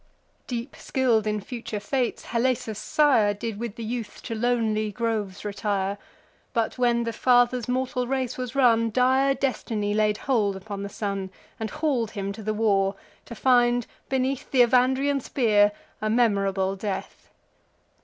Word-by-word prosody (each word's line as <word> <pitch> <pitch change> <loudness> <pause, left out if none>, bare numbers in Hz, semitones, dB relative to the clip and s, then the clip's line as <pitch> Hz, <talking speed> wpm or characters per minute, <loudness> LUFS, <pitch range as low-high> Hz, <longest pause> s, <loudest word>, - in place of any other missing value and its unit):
Deep 240 +1 -5
skill'd 235 -5 +1
in 210 0 0
future 225 0 -6
fates, 250 +3 -2
Halesus' 235 -3 0
sire 235 -10 +3
Did 215 0 -5
with 235 -2 -4
the 230 - -6
youth 230 0 -5
to 230 - -4
lonely 220 -2 0
groves 210 -3 -3
retire: 200 -1 -2 0.5
But, 230 +1 -1
when 240 -1 +2
the 230 0 -3
father's 245 0 +3
mortal 255 0 -1
race 260 -1 -1
was 250 -1 -5
run, 230 -4 +4
Dire 260 +3 +3
destiny 220 -6 -1
laid 210 0 +2
hold 215 -7 +1
upon 200 +1 -6
the 200 - -4
son, 200 -2 -3 0.3
And 220 -1 -3
haul'd 280 -7 0
him 200 -2 -4
to 220 - -9
the 215 +1 -2
war, 200 -3 +2 0.3
to 235 - -9
find, 245 -1 +3 0.2
beneath 265 +1 -1
Th' 250 -3 +5
Evandrian 260 +3 +2
spear, 210 -5 +3 0.3
a 215 - 0
memorable 195 -4 +2
death. 195 0 -5
230 Hz, 150 wpm, -25 LUFS, 210-250 Hz, 0.5 s, Th